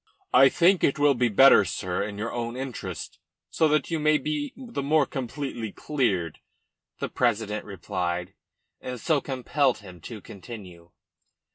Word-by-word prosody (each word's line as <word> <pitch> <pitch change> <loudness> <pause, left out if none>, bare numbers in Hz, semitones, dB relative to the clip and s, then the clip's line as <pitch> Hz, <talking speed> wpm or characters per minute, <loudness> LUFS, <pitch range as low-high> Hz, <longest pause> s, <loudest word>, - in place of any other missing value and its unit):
"I 135 - +8
think 180 +5 +3
it 140 - +3
will 145 -1 +4
be 120 -1 +1
better, 115 0 +7
sir, 90 -1 -3
in 100 0 -4
your 110 +3 -3
own 120 0 -3
interests, 130 -2 -6 0.3
so 160 - +3
that 155 +2 +1
you 165 - 0
may 155 0 +4
be 150 0 -3
the 240 - -5
more 150 +1 +3
completely 130 -4 -5
cleared," 100 - -1 0.6
the - - -3
president 110 -3 -1
replied, 90 -1 -3 0.5
and 125 -1 -6
so 150 +2 +1
compelled 135 0 0
him 90 -4 -13
to 110 +5 -8
continue. 95 -5 -11
120 Hz, 150 wpm, -26 LUFS, 100-145 Hz, 0.6 s, I